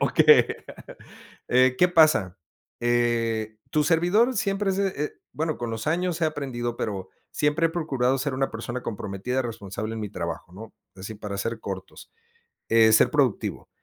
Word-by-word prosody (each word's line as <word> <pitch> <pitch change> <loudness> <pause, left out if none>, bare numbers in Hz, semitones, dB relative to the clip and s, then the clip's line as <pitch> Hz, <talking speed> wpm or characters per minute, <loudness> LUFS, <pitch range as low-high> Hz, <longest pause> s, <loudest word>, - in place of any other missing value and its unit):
okey. - - +6 1.0
Eh, 130 +1 +4
¿qué 180 - +5
pasa? 155 - +4 0.4
Eh, 115 -2 0
tu 150 -1 +2
servidor 180 - +3
siempre 195 0 0
se, 195 +1 +1
e 150 -6 -3
eh, - - -5 0.2
bueno, 155 0 -2
con 120 -1 -3
los 115 +4 -5
años 175 +1 0
he - - +5
aprendido, 125 -6 -3
pero 95 -5 -4 0.2
siempre 150 +2 +1
he - - -1
procurado 135 -6 0
ser 145 +1 -2
una 135 +1 -1
persona 120 +2 -5
comprometida, 110 +4 -3
responsable 110 -1 -5
en 110 - -5
mi 105 - -4
trabajo, 85 -2 -6
¿no? 110 +3 -10 0.2
Es 95 - -12
decir, 110 -2 -8
para 100 -2 -5
ser 115 +3 -3
cortos, 95 -1 -8 0.6
eh, 115 -1 +6
ser 110 - +5
productivo. 135 -7 0
120 Hz, 165 wpm, -25 LUFS, 110-155 Hz, 1.0 s, okey